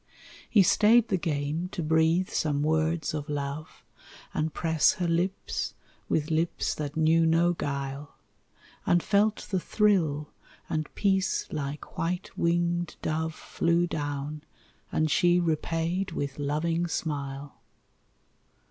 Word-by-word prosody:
He 205 -4 +6
stayed 220 +5 +5
the 190 - +2
game 155 +1 -2
to 175 - -3
breathe 160 +3 +2
some 145 -2 0
words 160 +1 +1
of 150 -1 -4
love 145 +1 -5 0.5
And 155 +1 -1
press 160 -1 +3
her 175 - -2
lips 175 +3 -1 0.3
with 155 +1 0
lips 165 +2 0
that 150 0 -5
knew 160 +1 +4
no 170 +2 +3
guile, 140 -2 -4 0.7
And 175 -1 +3
felt 210 +1 +2
the 190 - +2
thrill, 170 -8 +1 0.4
and 155 -2 -2
peace 190 -2 +1
like 145 -1 -5
white 175 +2 -2
winged 175 0 0
dove 160 0 -1
Flew 170 +1 +1
down, 145 -1 -4 0.5
and 155 -1 +1
she 175 +3 +4
repaid 165 +3 -1
with 140 -1 -4
loving 165 +4 0
smile. 140 -3 -4
160 Hz, 120 wpm, -28 LUFS, 150-175 Hz, 0.7 s, He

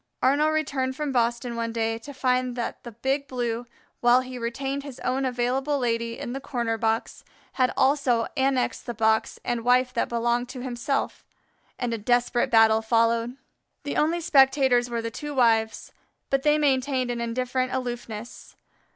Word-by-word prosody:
Arnaux 290 +4 +4
returned 275 -4 -1
from 295 0 -2
Boston 240 -1 0
one 230 0 -2
day 225 0 -1
to 260 +5 -10
find 255 -2 0
that 240 -2 -4
the 235 - -8
Big 270 +5 -2
Blue, 240 -2 -3 0.3
while 245 +1 +5
he 255 -1 -7
retained 270 +4 -3
his 275 -2 -10
own 265 +1 0
Available 260 +3 0
Lady 230 -2 -1
in 240 - -5
the 270 - -3
corner 235 -4 -2
box, 225 0 -2 0.3
had 255 -1 +2
also 265 -4 +2
annexed 265 -2 0
the 240 - -4
box 220 0 +1
and 240 -1 -1
wife 250 +1 +3
that 230 - 0
belonged 240 +1 0
to 255 -1 -7
himself, 255 +2 -2 0.5
and 245 -2 -2
a 230 - -3
desperate 240 +2 +1
battle 225 -1 +5
followed. 230 +2 +1 0.5
The 285 - -4
only 330 +3 +1
spectators 265 -4 +4
were 235 -1 -3
the 230 - -3
two 295 +4 -6
wives, 225 -3 +2 0.4
but 275 0 +2
they 300 +1 +3
maintained 265 -3 +1
an 235 -1 -3
indifferent 255 +2 -1
aloofness. 240 -3 -6
245 Hz, 165 wpm, -25 LUFS, 235-265 Hz, 0.5 s, while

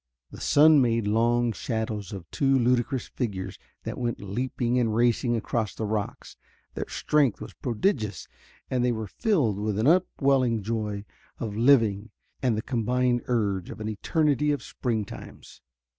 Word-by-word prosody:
The - - -10
sun 150 0 +6
made 115 -3 +1
long 120 +3 +2
shadows 110 -4 -3
of 95 -4 -7
two 135 -1 +2
ludicrous 125 +1 +1
figures 95 -6 -4 0.2
that - - -5
went 120 -1 -2
leaping 120 +4 -1
and 115 -3 +1
racing 120 +1 +2
across 110 -1 -2
the 110 - -3
rocks. 105 -1 -4 0.4
Their - - -4
strength 145 -7 +1
was - - -8
prodigious, 115 - -1 0.4
and 125 -1 0
they 125 - +2
were 110 -2 -3
filled 130 - 0
with 105 -1 -1
an 110 - +1
upwelling 135 - +2
joy 105 -2 -3 0.3
of 105 -3 -4
living 115 -4 +3 0.3
and 125 -4 +1
the 110 - -2
combined 125 0 +1
urge 100 -7 0
of - - -8
an 110 0 -3
eternity 150 - +1
of 145 - -2
spring 115 -5 -2
times. - - -11
115 Hz, 155 wpm, -26 LUFS, 105-125 Hz, 0.4 s, sun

